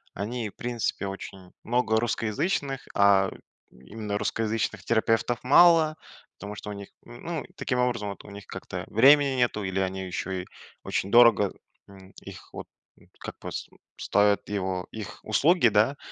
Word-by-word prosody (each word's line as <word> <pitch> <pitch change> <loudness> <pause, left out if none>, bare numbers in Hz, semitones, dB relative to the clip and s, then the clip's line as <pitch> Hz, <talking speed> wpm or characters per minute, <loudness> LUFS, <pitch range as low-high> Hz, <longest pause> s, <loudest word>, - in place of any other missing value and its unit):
Они, 110 +2 -4
в - - -21
принципе, 120 -4 -3
очень 95 -1 -8
много 115 -2 +1
русскоязычных, 130 - -2
а 100 -1 +4 0.4
именно 100 - -6
русскоязычных 110 -3 -2
терапевтов 115 +2 0
мало. 160 +2 +6 0.4
Потому 105 0 -7
что 105 - -7
у - - -5
них, 100 -1 -8 0.2
н 120 0 -12
ну, 165 -2 -4
таким 125 - -2
образом 120 -4 0
вот 100 - -8
у 105 - -11
них, 100 0 -11
как-то - - -7
времени 135 +3 +5
нету 120 -4 0
или 95 0 -2
они 95 0 -2
еще 90 +1 -4
и - - -10 0.4
очень 100 - -2
дорого, 115 -4 +6 0.3
м, 95 -1 -15
их - - -11
вот, - - -8 0.5
как - - -8
пос - - -7 0.3
ставят 105 0 +1
его 95 -2 -3
их 110 -3 -8
услуги, 145 +6 +3
да. 110 +7 +2
110 Hz, 155 wpm, -26 LUFS, 100-125 Hz, 0.5 s, мало